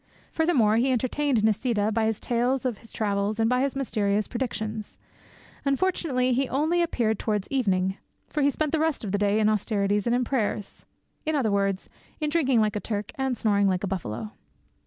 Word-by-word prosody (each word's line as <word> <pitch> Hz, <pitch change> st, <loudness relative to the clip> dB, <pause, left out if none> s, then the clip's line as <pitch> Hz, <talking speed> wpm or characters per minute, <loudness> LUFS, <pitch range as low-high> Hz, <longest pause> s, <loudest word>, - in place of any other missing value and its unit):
Furthermore, 260 Hz, -11 st, +3 dB
he 260 Hz, +3 st, +2 dB
entertained 255 Hz, -1 st, +1 dB
Nisida 220 Hz, 0 st, +1 dB
by 220 Hz, 0 st, +1 dB
his 220 Hz, -1 st, -1 dB
tales 245 Hz, +2 st, 0 dB
of 240 Hz, -5 st, -1 dB
his 230 Hz, -, -15 dB
travels 205 Hz, 0 st, -1 dB
and 225 Hz, -, +3 dB
by 250 Hz, +2 st, +2 dB
his 275 Hz, 0 st, 0 dB
mysterious 210 Hz, -6 st, 0 dB
predictions. 220 Hz, -4 st, -4 dB, 0.7 s
Unfortunately, 275 Hz, -4 st, +1 dB
he 265 Hz, +2 st, 0 dB
only 315 Hz, +6 st, +1 dB
appeared 230 Hz, -10 st, 0 dB
towards 210 Hz, -3 st, -1 dB
evening; 190 Hz, -7 st, +1 dB, 0.3 s
for 300 Hz, -, -2 dB
he 285 Hz, -, +4 dB
spent 305 Hz, +1 st, -1 dB
the 320 Hz, -, +1 dB
rest 315 Hz, -4 st, 0 dB
of 200 Hz, -, -3 dB
the 205 Hz, -, 0 dB
day 205 Hz, +1 st, +2 dB
in 215 Hz, -, +3 dB
austerities 205 Hz, -1 st, +1 dB
and 235 Hz, -, +3 dB
in 250 Hz, -, +1 dB
prayers—in 245 Hz, +5 st, -4 dB
other 245 Hz, -7 st, +1 dB
words, 195 Hz, -1 st, 0 dB, 0.3 s
in 300 Hz, -1 st, -1 dB
drinking 270 Hz, -7 st, +3 dB
like 215 Hz, -1 st, +1 dB
a -, -, 0 dB
Turk 205 Hz, -1 st, -4 dB
and 265 Hz, -2 st, -1 dB
snoring 205 Hz, -2 st, +2 dB
like 185 Hz, 0 st, 0 dB
a -, -, 0 dB
buffalo. 110 Hz, -, -4 dB
225 Hz, 185 wpm, -26 LUFS, 205-265 Hz, 0.7 s, he